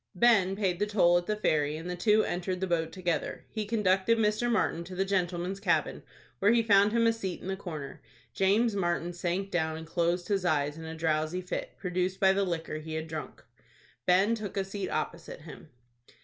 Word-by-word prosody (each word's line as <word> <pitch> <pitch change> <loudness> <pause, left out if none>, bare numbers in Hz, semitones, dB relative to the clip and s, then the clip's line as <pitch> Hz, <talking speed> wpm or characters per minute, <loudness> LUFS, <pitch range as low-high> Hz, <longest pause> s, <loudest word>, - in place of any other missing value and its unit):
Ben 195 -3 +4
paid 190 -4 -1
the 210 - +1
toll 175 -4 +4
at 175 - -10
the 210 - 0
ferry, 150 -7 +1
and 165 +2 -7
the 180 - -3
two 210 +4 +3
entered 180 +1 -2
the 190 - 0
boat 165 -3 -1
together. 175 -3 -3
He 215 -2 -3
conducted 210 0 +2
Mr. 215 +2 +1
Martin 170 -6 +1
to 185 +1 -8
the 190 +1 0
Gentleman's 185 0 -1
Cabin, 195 - 0 0.4
where 200 +3 +4
he 235 0 +4
found 205 -1 +5
him 230 0 +2
a 230 - +4
seat 195 -6 -4
in - - -9
the 190 - -1
corner. 155 -6 -7 0.3
James 205 +3 +2
Martin 175 -2 -1
sank 180 +3 -2
down, 160 -2 0
and 160 - -8
closed 175 +1 0
his 200 -3 0
eyes 150 -4 +1
in 160 0 -9
a 160 0 -6
drowsy 160 +1 0
fit, 180 - -5
produced 185 0 -2
by 190 -1 +5
the 200 +1 +1
liquor 165 -4 -3
he 155 0 -6
had 160 0 -3
drunk. 155 -1 -7 0.6
Ben 190 +5 +4
took 210 -4 -5
a 195 - +1
seat 195 0 -5
opposite 170 -2 -4
him. 155 -1 -12
185 Hz, 205 wpm, -29 LUFS, 170-200 Hz, 0.6 s, found